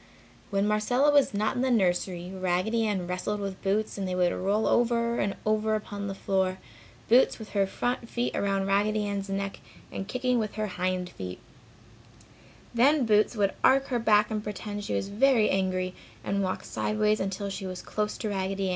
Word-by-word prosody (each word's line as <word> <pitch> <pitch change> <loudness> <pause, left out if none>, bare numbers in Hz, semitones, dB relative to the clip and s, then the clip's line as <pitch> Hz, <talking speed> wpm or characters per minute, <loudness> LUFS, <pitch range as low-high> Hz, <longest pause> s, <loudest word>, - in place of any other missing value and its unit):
When 200 0 +1
Marcella 245 +7 +3
was 285 -2 +4
not 210 +1 0
in 245 - -1
the 260 - +1
nursery, 180 -4 0
Raggedy 190 +5 0
Ann 195 -4 -1
wrestled 180 +4 -2
with 195 -2 -5
Boots 205 +1 -1
and 195 - -2
they 180 - -2
would 180 -1 +2
roll 200 +4 0
over 235 0 +2
and 195 0 0
over 215 0 +1
upon 205 -1 -5
the 195 - -4
floor, 190 -1 0 0.5
Boots 245 +3 +5
with 220 -2 -9
her 200 -2 +1
front 245 +3 -2
feet 240 0 -2
around 195 -1 0
Raggedy 210 +2 +1
Ann's 200 -1 -3
neck 195 0 -3 0.3
and 195 - -5
kicking 250 +1 0
with 215 -2 -3
her 215 0 -1
hind 185 -2 -2
feet. 90 - -7 1.4
Then 265 +3 +4
Boots 215 +1 +3
would 200 -2 +1
arch 270 +1 +4
her 245 -2 0
back 210 -1 +3
and 215 -1 -2
pretend 205 0 -5
she - - -2
was 195 - -2
very 230 +1 +3
angry 185 -1 0 0.3
and 200 0 -1
walk 185 -1 -2
sideways 215 0 0
until 195 +1 -3
she 195 0 -5
was 185 -1 -6
close 210 0 -2
to 215 - -3
Raggedy. 195 -1 -1
205 Hz, 185 wpm, -28 LUFS, 190-220 Hz, 1.4 s, Boots